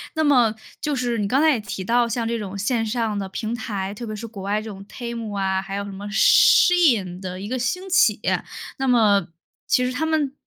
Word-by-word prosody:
那 315 - +1
么 245 -7 +4 0.2
就 300 -1 -2
是 245 -2 -1
你 205 -2 -1
刚 265 +7 +2
才 320 - +5
也 255 - 0
提 200 -2 -6
到 235 +4 +2
像 235 0 -2
这 230 0 -2
种 200 -2 -6
线 225 +3 0
上 220 -2 -1
的 195 - -4
平 220 +3 -4
台， 205 -4 -4
特 235 +3 -7
别 215 - -5
是 215 +2 -7
国 215 -3 -9
外 205 +2 -1
这 220 - -8
种 195 -1 -10
TEMU 230 -4 -6
啊， 190 -1 0
还 195 0 -6
有 200 - -3
什 200 - -7
么 200 +1 -8
SHEIN 235 - +4
的 185 -1 -6
一 205 - -6
个 255 +1 -2
兴 365 +10 -2
起。 370 - +3 0.6
那 270 - -1
么 210 -7 +3 0.4
其 250 - +2
实 250 - -1
它 285 +5 -2
们 310 -4 0
225 Hz, 285 characters per minute, -22 LUFS, 200-250 Hz, 0.6 s, 才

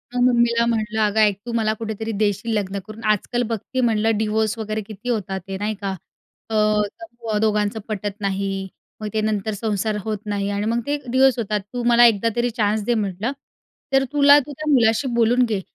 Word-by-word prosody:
मग 245 - +1
मम्मीला 235 -1 +3
म्हणलं 220 -1 -1
अगं 210 +1 +2
ऐक, 210 -2 +4
तू 240 - -4
मला 220 -2 +1
कुठेतरी 220 0 -4
देशील 205 +2 0
लग्न 200 -1 -1
करून. 220 +1 -10
आजकाल 240 +4 0
बघते 230 +4 -2
म्हणलं 225 -2 +2
डिवोर्स 220 +1 0
वगैरे 215 0 -3
किती 220 +3 -7
होतात 195 -4 -2
ते. 190 0 -4
नाही 210 +1 -2
का? 195 -1 -2 0.6
अ, - - -5 0.5
तत्व 235 -9 -4
दोघांचं 210 0 +1
पटत 205 -2 -3
नाही. 195 0 -2 0.3
मग 215 - -3
ते 215 - +1
नंतर 215 0 -1
संसार 210 0 -1
होत 215 -1 -2
नाही 200 -1 -2
आणि 205 +1 -2
मग 235 - +1
ते 290 0 0
डिवोर्स 260 0 +4
होतात. 210 -1 -1
तू 245 -1 -3
मला 240 0 +6
एकदा 230 0 +4
तरी 240 0 +1
चान्स 210 0 +1
दे 240 - +2
म्हटलं. 210 +2 -1 0.6
तर 270 0 +5
तुला 285 0 +7
तू 290 +1 -7
त्या 310 0 -3
मुलाशी 235 0 +3
बोलून 240 +2 +4
घे. 210 -4 -2
220 Hz, 195 wpm, -22 LUFS, 205-235 Hz, 0.6 s, तुला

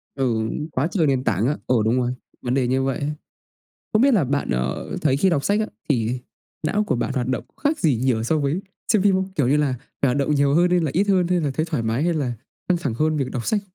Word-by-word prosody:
Ừ, 115 -5 0 0.2
quá 135 +5 +1
trời 165 -6 +2
nền 130 -2 +1
tảng 110 +2 +1
á, 150 - +1
ờ, 125 - +3
đúng 120 +3 +2
rồi, 125 0 0 0.3
vấn 125 +1 -1
đề 130 -2 +2
như 130 +1 +1
vậy 135 0 -1
ấy. 145 +1 -2 0.8
Không 215 - +4
biết 275 -1 +5
là 185 -9 +4
bạn, 140 +2 -1
ờ, 65 +1 -2
thấy 140 -3 +2
khi 190 +5 +3
đọc 145 -5 +1
sách 205 +1 +2
á, 215 - +1 0.2
thì 120 -1 +1 0.4
não 205 +7 +1
của 210 - 0
bạn 130 - -2
hoạt 125 -2 -1
động 130 -2 -1 0.2
khác 305 +2 +1
gì 145 -8 +2
nhiều 120 -2 +1
so 155 +7 +1
với 145 +7 0 0.3
xem 210 - +4
phim 195 -1 +4
không? 190 0 -1
Kiểu 140 -5 +2
như 145 +3 +3
là 145 -3 +2 0.3
phải 140 - +4
hoạt 130 - 0
động 145 +1 +1
nhiều 140 0 +3
hơn 175 +2 +4
hay 180 0 +3
là 155 -5 -1
ít 200 +4 +2
hơn, 185 -3 +3
hay 180 -1 +2
là 145 -3 0
thấy 155 +3 0
thoải 150 -9 -2
mái, 115 +5 0
hay 175 0 +2
là 135 -6 -1 0.4
căng 180 - +4
thẳng 140 -9 -2
hơn 155 +4 +1
việc 135 -2 -2
đọc 120 -3 -4
sách? 210 -2 +1
140 Hz, 275 wpm, -22 LUFS, 125-175 Hz, 0.8 s, biết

